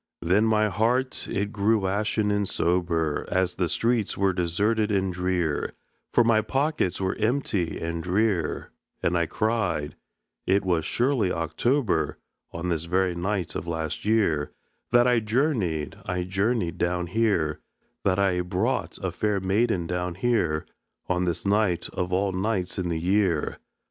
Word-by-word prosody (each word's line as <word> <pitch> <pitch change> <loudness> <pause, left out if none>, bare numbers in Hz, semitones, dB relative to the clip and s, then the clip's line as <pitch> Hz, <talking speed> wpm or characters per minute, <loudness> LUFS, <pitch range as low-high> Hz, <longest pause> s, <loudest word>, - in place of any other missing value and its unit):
Then 95 +6 +3
my 110 -1 +3
heart 120 +6 0
it 100 +1 -2
grew 105 0 +2
ashen 105 +2 0
and 105 -1 0
sober, 85 -3 0
As 95 -1 +1
the 90 -3 -1
streets 115 +4 0
were 95 -1 +2
deserted 105 +5 +1
and 95 -2 +1
drear, 90 -4 -1 0.4
For 120 - +5
my 115 -1 +4
pockets 135 - 0
were 95 -1 0
empty 110 -6 0
and 85 0 -3
drear; 95 -2 0 0.3
And 90 - +2
I 85 -1 +2
cried: 95 -10 -1 0.5
"It 95 +1 +2
was 85 -4 +1
surely 120 -5 +1
October, 120 - 0 0.3
On 85 +2 -4
this 85 -1 -1
very 90 +1 +1
night 90 -2 -2
of 80 - -5
last 80 -2 -3
year, 100 -9 +2 0.4
That 120 0 +5
I 125 -1 +4
journeyed, 110 - 0
I 90 -1 -1
journeyed 95 0 -1
down 90 0 0
here, 90 -6 +1 0.4
That 95 -1 +2
I 95 -2 +2
brought 95 +8 -1
a 95 - -1
fair 105 +2 0
maiden 95 -1 +1
down 90 0 -2
here, 90 -7 +1 0.4
On 90 0 +1
this 85 +1 -2
night 100 -4 +1
of 90 0 -3
all 95 +2 +1
nights 95 -1 -1
in 90 -1 -1
the 80 -1 -1
year! 90 -2 +1
95 Hz, 150 wpm, -26 LUFS, 85-110 Hz, 0.5 s, For